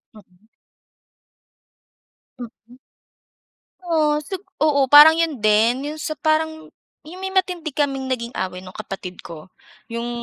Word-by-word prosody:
Mm. 200 -1 -21 1.9
Mm. 240 0 -12 1.1
Oh, 305 -3 +1
sup 380 -1 -6 0.2
oo, 300 -2 +2
parang 300 +2 +9
'yon 325 -5 -1
din, 225 +6 +2
'yong 305 +1 -7
sa - - -4
parang 315 0 -1 0.4
'yong 360 +4 -10
may 380 - -3
matindi 360 -4 -1
kaming 270 -2 -2
naging 235 -1 -4
away 185 -1 -4
no'ng 185 0 -13
kapatid 195 -3 -8
ko. 160 0 -11 0.4
'Yong, 235 +1 -5
275 Hz, 125 wpm, -21 LUFS, 215-315 Hz, 1.9 s, parang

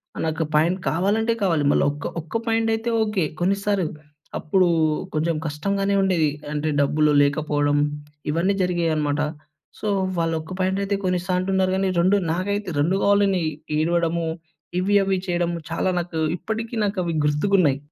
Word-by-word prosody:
ఆ - - -10
నాకు 160 0 -1
ప్యాంట్ 165 +5 +3
కావాలంటే 205 +9 +1
కావాలి. 165 -6 +2
మళ్ళీ - - +3
ఒక్క 145 - -6
ఒక్క 160 +8 -3
ప్యాంటైతే 225 0 +1
ఓకె, 210 -4 0 0.2
కొన్నిస్తారు. 200 +1 +1 0.5
అప్పుడు 185 +3 +2 0.5
కొంచెం 160 +2 0
కష్టంగానే 195 +6 -1
ఉండేది. 180 -5 +2 0.2
అంటే 150 +1 -1
డబ్బులు 150 +1 +2
లేకపోవడం 145 0 +1 0.5
ఇవన్నీ 170 +6 +1
జరిగేయనమాట. 160 -5 0 0.6
సో, 215 - -4 0.3
వాళ్ళొక్క 165 0 -1
ప్యాంటైతే 195 +2 0
కొన్నిస్తా 180 0 -1
అంటున్నారు 190 0 +1
కానీ 190 0 +1
2 190 +4 +4 0.2
నాకైతే, 200 +3 -2
2 165 +6 +2
కావాలని 200 -3 +3 0.3
ఏడవడము. 170 +1 +1 0.5
ఇవి, 200 +3 +1
అవి 195 -1 +1
చేయడము, 175 -1 0
చాలా 165 - 0
నాకు 170 -2 -4 0.2
ఇప్పటికి 225 +3 -4
నాకవి 185 -4 -1
గుర్తుకున్నాయి. 150 -1 +2
180 Hz, 130 wpm, -23 LUFS, 160-200 Hz, 0.6 s, 2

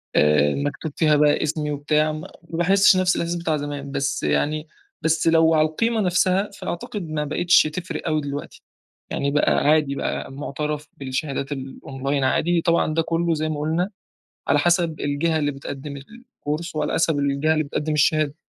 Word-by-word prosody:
آآ 75 -1 +4
مكتوب 145 +2 -3
فيها 155 -2 +3
بقى 150 0 +3
اِسمي 150 -1 -1
وبتاع، 150 +2 +1
ما 155 0 -7 0.2
باحسش 190 +4 +4
نفس 185 -1 +2
الإحساس 170 +1 -1
بتاع 165 -2 -1
زمان، 145 -1 -5
بس 140 0 -1
يعني، 150 - 0 0.3
بس 160 +1 +1
لو 165 0 +5
على 155 0 +4
القيمة 225 +7 0
نفسها، 185 +2 +2
فأعتقد 180 +3 -5
ما 150 -1 -1
بقيتش 175 +4 +4
تفرِق 170 +4 -5
أوي 155 -1 +1
دلوقتي 145 0 -6 0.5
يعني، 140 0 -1
بقى 150 - +2 0.2
عادي 150 -2 +3
بقى، 135 - -3
مُعْتَرف 150 +2 -4
بالشهادات 140 +1 -3
الأونلاين 135 0 -3
عادي 170 +5 +2
طبعًا، 170 -2 +2
ده 165 - +2
كله 165 +1 0
زي 155 0 -1
ما 150 -1 -3
قلنا، 160 +5 0 0.6
على 145 - +4
حَسَب 170 0 +1
الجهة 155 +3 0
اللي 145 -1 0
بتقدم 140 +1 -7
الكورس، 170 - -7
وعلى 150 0 -1
حَسَب 160 -3 +1
الجهة 140 +2 +1
اللي 155 - 0
بتقدم 150 +2 -3
الشهادة. 150 -1 +2
155 Hz, 165 wpm, -23 LUFS, 145-165 Hz, 0.6 s, لو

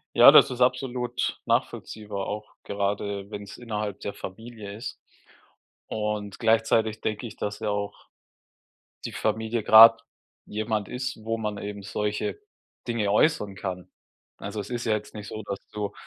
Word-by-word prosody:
Ja, - - +10
das - - +8
ist 125 0 -5
absolut 125 -1 0
nachvollziehbar, 105 -2 -2
auch 105 +1 -5
gerade 100 0 -2
wenn's 100 -1 -7
innerhalb 105 -4 -4
der 100 - -4
Familie 110 +1 -8
ist. 110 - -7 0.9
Und 105 -2 -3
gleichzeitig 110 -1 +2
denke 110 +2 -2
ich, 115 - -8
dass 105 0 -3
ja 110 -1 -2
auch 100 0 -4 1.0
die - - -4
Familie 110 +1 -1
grad 115 +2 +9 0.5
jemand 110 -1 -2
ist, 125 -3 -4
wo 115 +1 -1
man 105 -2 -3
eben 100 0 -6
solche 105 - -2 0.5
Dinge 110 -4 0
äußern 105 -3 +3
kann. 95 -2 -5 0.5
Also, 100 +2 -5
es 100 +3 -6
ist 120 -1 -3
ja 110 - +2
jetzt 105 -1 -4
nicht 105 -1 -7
so, 110 +1 -6
dass 100 -1 -4
du 105 -1 -3
105 Hz, 150 wpm, -26 LUFS, 100-115 Hz, 1.0 s, Ja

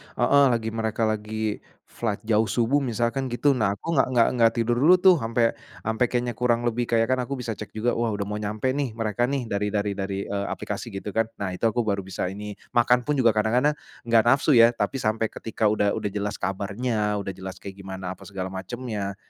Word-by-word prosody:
heeh, 140 0 +4
lagi 110 -1 -1
mereka 110 0 -2
lagi 110 0 -2 0.3
flight 110 -4 -3
jauh 110 0 +3
subuh 120 +5 +2
misalkan 120 +2 -1
gitu, 140 +4 +3
nah 105 -4 +1
kok 160 - -8
enggak 135 - +4
enggak 120 -2 +4
enggak 115 -1 +5
tidur 120 +1 +1
dulu 165 +7 +7
tuh 185 -1 +7
sampe 115 0 +1 0.3
sampe 110 +2 0
kayaknya 120 -2 -1
kurang 120 -1 +2
lebih 120 +1 0
kayak 115 -1 +2
kan 130 - +2
aku 140 - -5
bisa 120 -2 -3
cek 110 - -8
juga 120 +3 0
wah 115 -1 0
udah 100 -1 -3
mau 105 - -3
nyampe 105 +4 -2
nih 140 -5 -2
mereka 115 +1 -1
nih 140 -1 -1
dari 100 +1 -1
dar 100 - +2
dari, 100 -1 -3
eee, 100 0 -2
aplikasi - - -4
gitu 100 +2 -5
kan. 115 +2 +1 0.2
Nah, 95 - -1
itu - - -13
aku 120 +2 +1
baru 100 -2 0
bisa 95 -1 -3
ini. 105 +1 -6 0.2
Makan 120 +1 +4
pun 150 -1 +1
juga 120 -3 +4
kadang-kadang 125 +7 +2 0.3
nggak 115 -2 +5
nafsu 135 +5 +4
ya 115 0 +8
tapi 125 +2 -2
sampai 110 +1 +1
ketika 110 0 -2
udah 105 -1 +2
udah 105 - -2
jelas 105 0 -3
kabarnya 105 +3 -1
udah 100 -1 -4
jelas 95 0 -8
kayak 95 -1 -8
gimana 95 -1 -6
apa - - -14
segala 95 -2 -5
macemnya, 100 0 -5
110 Hz, 215 wpm, -25 LUFS, 100-120 Hz, 0.3 s, ya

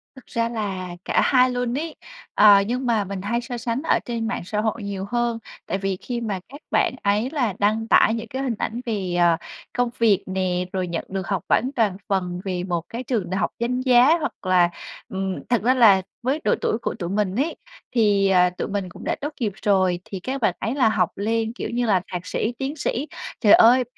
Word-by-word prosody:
Thực 260 - -14
ra 230 0 -1
là 195 -5 -3 0.2
cả - - +2
hai 255 -1 +4
luôn 245 +1 -1
ấy. 320 +1 -4 0.4
Ờ, 205 -1 +7
nhưng 250 +2 -2
mà 225 -4 +2
mình 195 -1 -5
hay 235 +4 -1
so 240 0 -5
sánh 235 +2 -2
ở 325 - +2
trên 230 -2 -2
mạng 245 - -2
xã 210 +2 -1
hội 220 0 -2
nhiều 200 -1 -4
hơn 240 -1 0 0.3
tại 195 - -1
vì 195 -1 -2
khi 240 -2 -4
mà 205 -4 -2
các 285 +2 -11
bạn - - +2
ấy 210 +5 +1
là 250 -10 0
đăng 215 +2 +1
tải 225 - +5
những 230 0 -4
cái 260 +4 -4
hình 245 -4 -1
ảnh 235 +3 -3
về, 195 -6 -2
ờ, 170 -1 +4 0.4
công 245 -1 +2
việc 215 -5 +3
nè, 185 -1 -1
rồi 185 -1 -1
nhận 170 - -3
được 190 0 -4
học 195 -3 -1
bỗng 260 +3 +2
toàn 210 -6 +1
phần 180 -2 -1
về 180 -2 -2
một 175 -3 -1
cái 235 +2 -5
trường 225 -8 -2
đại 190 - -1
học - - +1
danh 250 +2 -1
giá 255 +5 +5
hoặc - - -2
là 180 -2 +4 0.4
ừm, 190 -1 -2
thật 240 - +2
ra 250 +3 +4
là 215 -7 +6 0.2
với 275 +5 0
độ - - +3
tuổi 220 - +1
của - - -2
tụi 175 -1 -3
mình 200 -1 0
ấy 285 +8 0 0.4
thì, 205 -3 +3
ờ, 180 -1 +5
tụi 180 - -5
mình 200 -2 -3
cũng - - -12
đã - - -1
tốt 295 +1 -4
nghiệp 220 -4 0
rồi 185 -3 +2
thì 195 - -6
các 260 +8 -4
bạn 185 -5 +2
ấy 225 +6 -2
là 250 -6 +4
học - - +1
lên, 225 +2 -1
kiểu - - -4
như 240 +1 -1
là, 195 -5 +3
thạc 180 0 -4
sĩ, 225 - -2
tiến 270 +3 -3
sĩ. 280 -1 -2 0.3
Trời 210 -3 +6
ơi! 250 +3 +7
220 Hz, 235 wpm, -23 LUFS, 190-245 Hz, 0.4 s, Ờ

